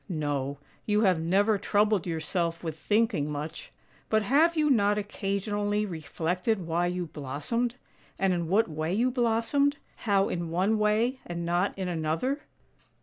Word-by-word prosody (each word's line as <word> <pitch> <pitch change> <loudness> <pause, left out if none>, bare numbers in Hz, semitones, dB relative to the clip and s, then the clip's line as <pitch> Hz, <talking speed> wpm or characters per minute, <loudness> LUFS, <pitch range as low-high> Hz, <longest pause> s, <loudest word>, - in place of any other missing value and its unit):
" - - -36 0.2
No, 140 -1 -2 0.3
you 210 0 +3
have 185 -6 +3
never 200 +6 +2
troubled 205 -3 +2
yourself 165 +1 -1
with 160 -2 -3
thinking 195 -5 +1
much. 150 +2 -6 0.4
But 220 -1 +3
have 315 +9 +3
you 300 -2 +3
not 205 -4 +3
occasionally 205 +1 -1
reflected 180 +3 -2
why 170 +2 +1
you 180 0 -2
blossomed, 155 - -3 0.4
and 195 -1 +2
in 170 -2 -1
what 205 +6 +3
way 160 +2 -2
you 245 +4 +2
blossomed 250 +4 +1
— - - -34
how 200 -1 +3
in 170 -2 -3
one 190 +6 +1
way 220 +5 +2
and 170 -1 -4
not 175 +4 0
in 190 -1 -2
another? 170 - -1
195 Hz, 155 wpm, -28 LUFS, 165-220 Hz, 0.4 s, you